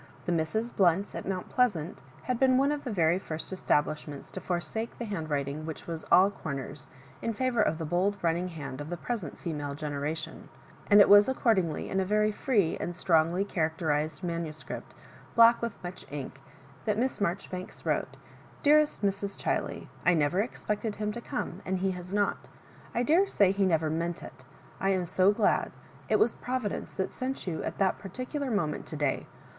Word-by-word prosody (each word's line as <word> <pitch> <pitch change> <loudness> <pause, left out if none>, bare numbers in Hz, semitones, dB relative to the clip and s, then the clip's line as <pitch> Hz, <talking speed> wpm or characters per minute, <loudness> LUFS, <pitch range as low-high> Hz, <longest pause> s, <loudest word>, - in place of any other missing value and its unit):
The - - 0
Misses 175 +9 0
Blount's 190 +1 +2
at - - -5
Mount 185 -1 -2
Pleasant 200 - +1 0.2
had 250 -2 -1
been 260 -1 +5
one 275 +2 +3
of 295 -1 -2
the 255 - -4
veiy 175 -1 +2
first 160 +2 -5
establishments 150 -4 -1
to 190 - -6
forsake 205 +6 -3
the 240 - -4
hand 175 -7 -4
writing 140 +1 -2
which 160 -1 -6
was 165 -2 -5
all 190 +2 +7
comers, 140 -8 -6 0.3
in 230 - -1
&vour 250 0 +1
of 160 -6 +2
the 160 - -4
bold 185 +6 +1
running 170 +2 +1
hand 145 -5 -6
of 145 - -6
the 175 - -3
present 205 - -4
female 145 -4 -4
genera 145 +1 -2
tion; 155 - -8 0.4
and 205 0 +9
it - - +7
was 205 +3 +8
accordingly 195 - +1
in 195 - 0
a - - +2
very 210 +2 +2
free 205 -6 +1
and 175 +1 -3
strongly 170 +1 +2
characterised 155 -3 -1
manuscript, 165 -3 -5 0.4
black 230 0 +7
with 235 -3 -3
much 180 +1 -7
ink, 135 -1 -6 0.4
that 210 -1 +1
Miss 255 -1 -1
Marjoribanks 185 0 -3
wrote - - -1 0.2
— - - -24
"Dearest 300 -4 +4
Mrs. 200 0 -1
Chtlet, - - -2
— - - -21
^I 180 -2 +6
never 155 +5 +2
expected 215 -1 -3
him 210 0 -2
to 235 +2 -6
come, 190 -4 -4
and 190 0 -1
he 190 +1 0
has 180 0 -7
not. 205 0 0 0.5
I 240 - +2
daresay 310 - +4
he 195 0 +2
never 160 -3 +2
meant 170 +2 -2
it. - - -11 0.4
I 195 - +1
am 185 -2 +1
so 185 +3 +4
glad. 205 - +1 0.4
It 215 - +4
was 230 - +3
Providence 250 -5 -3
that 190 - -2
sent 260 +1 -4
you 170 -4 -2
at - - -4
that 190 -2 +2
particular 255 - -4
moment 165 -10 -1
to - - -6
day. 145 -3 -1
185 Hz, 190 wpm, -29 LUFS, 160-215 Hz, 0.5 s, and